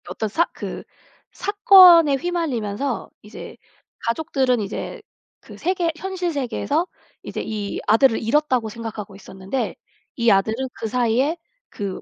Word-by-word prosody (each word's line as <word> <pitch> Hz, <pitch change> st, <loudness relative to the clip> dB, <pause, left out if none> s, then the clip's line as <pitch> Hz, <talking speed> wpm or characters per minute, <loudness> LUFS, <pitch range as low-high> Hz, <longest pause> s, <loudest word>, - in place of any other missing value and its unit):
어떤 220 Hz, -, -3 dB
사 330 Hz, +12 st, +2 dB
그 -, -, -7 dB, 0.5 s
사건에 370 Hz, -7 st, +6 dB
휘말리면서 275 Hz, -7 st, -3 dB
이제 210 Hz, -, -10 dB, 0.4 s
가족들은 260 Hz, -1 st, 0 dB
이제 210 Hz, -, -6 dB, 0.4 s
그 -, -, -14 dB
세계 350 Hz, -1 st, 0 dB
현실 370 Hz, 0 st, -3 dB
세계에서 285 Hz, +5 st, -1 dB, 0.4 s
이제 -, -, -5 dB
이 210 Hz, -2 st, -4 dB
아들을 225 Hz, +3 st, +4 dB
잃었다고 250 Hz, -1 st, +1 dB
생각하고 215 Hz, -3 st, -7 dB
있었는데 195 Hz, +5 st, -5 dB, 0.4 s
이 235 Hz, -1 st, +3 dB
아들은 220 Hz, +6 st, +1 dB
그사이에 250 Hz, +7 st, 0 dB, 0.3 s
그 200 Hz, -3 st, -5 dB
255 Hz, 280 characters per minute, -22 LUFS, 220-330 Hz, 0.5 s, 사건에